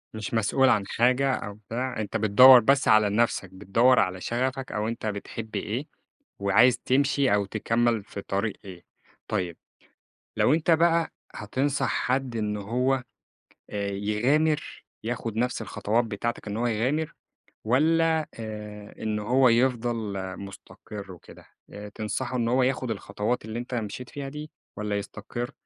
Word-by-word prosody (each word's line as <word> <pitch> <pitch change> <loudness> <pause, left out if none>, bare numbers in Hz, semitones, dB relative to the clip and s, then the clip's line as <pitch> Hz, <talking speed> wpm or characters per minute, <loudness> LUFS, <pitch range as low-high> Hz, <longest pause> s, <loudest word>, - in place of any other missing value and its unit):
مش 110 +1 -5
مسؤول 125 +4 +3
عن 100 -2 +2
حاجة 130 +3 +2
أو 105 -4 -4
بتاع، 115 +4 -5
أنتَ 105 +2 -2
بتدوَّر 125 +5 +8
بس 135 +4 +2
على 110 -1 +5
نفسَك، 105 -3 0
بتدوَّر 115 +6 +3
على 95 0 0
شغفك 130 +2 -2
أو 105 +1 -2
أنتَ 115 -1 -4
بتحب 110 +1 -5
إيه 115 +8 -3 0.5
وعايِز 100 +5 +4
تمشي 140 -2 +2
أو 100 -1 +2
تكمّل 115 +1 0
في 100 - -8
طريق 100 +2 -2
إيه. 90 -2 -11 0.4
طيب 90 -5 -2 0.8
لو 140 - +4
أنتَ 165 +1 +1
بقى 165 0 +3 0.2
هتنصح 135 +7 -1
حد 130 -2 -1
إنه 105 -1 -2
هو 125 +5 0 0.7
آآ، 100 -1 -2
يغامر، 130 +10 0 0.2
ياخُد 115 -1 -4
نفس 125 +1 0
الخطوات 110 +3 0
بتاعتك 110 +1 -4
إن 105 +1 -3
هو 120 - 0
يغامر، 130 +8 0 0.5
والَّا 160 +5 +2
آآ، 105 -1 -7
إنه 105 -1 -2
هو 125 +2 +4
يفضل 120 -3 +1 0.2
مستقر 100 0 -10
وكده، 90 - -14 0.2
آآ، 105 0 -9
تنصَحه 120 +4 -3
إن 115 -1 0
هو 125 +2 +3
ياخُد 130 -2 0
الخطوات 105 +3 -3
اللي 110 +2 -5
أنتَ 125 +1 -5
مشيت 115 +2 -5
فيها 140 -1 -6
دي، 150 +2 -8 0.3
والّا 105 -1 -2
يستقر 120 +5 -5
115 Hz, 145 wpm, -26 LUFS, 105-130 Hz, 0.8 s, بتدوَّر